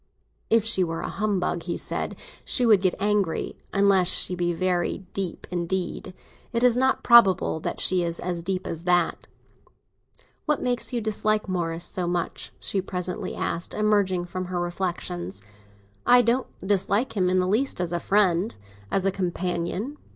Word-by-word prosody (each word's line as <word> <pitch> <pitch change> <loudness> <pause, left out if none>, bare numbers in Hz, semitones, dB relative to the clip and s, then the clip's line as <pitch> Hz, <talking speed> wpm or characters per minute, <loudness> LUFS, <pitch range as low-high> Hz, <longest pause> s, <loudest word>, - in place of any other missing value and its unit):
"If 225 -1 +3
she 225 -5 +2
were 165 -1 -3
a - - -4
humbug," 195 -4 -1
he 170 0 -3
said, - - -2 0.3
"she 250 - +1
would 215 -5 +5
get 185 -2 +2
angry; 205 -4 0
unless 195 -2 +4
she 185 - +2
be 175 -1 0
very 180 +2 -1
deep 190 -3 -3
indeed. 180 +1 -3 0.4
It 235 +1 0
is 245 -2 +5
not 260 +1 +2
probable 195 -8 +5
that - - -4
she 185 -1 +3
is 170 0 -1
as 175 -1 -3
deep 185 +1 -3
as 165 +1 -5
that." 175 -2 +1 1.2
"What 300 -1 +2
makes 245 0 -1
you 240 -2 -1
dislike 215 0 0
Morris 170 -2 -1
so 180 -2 -3
much?" 175 -1 -3
she 195 - -1
presently 180 -1 -4
asked, 170 - -3
emerging 200 -4 +2
from 185 +1 -5
her 180 0 -3
reflexions. 170 - -3 0.6
"I 245 0 +6
don't 245 +3 +1 0.2
dislike 205 +4 +1
him 185 -3 +2
in 185 - +2
the 185 - +2
least 225 +6 +1
as 175 -1 -2
a 175 - 0
friend, 195 0 +2 0.3
as 195 -1 0
a 195 - +3
companion. 185 - -2
185 Hz, 165 wpm, -25 LUFS, 175-210 Hz, 1.2 s, I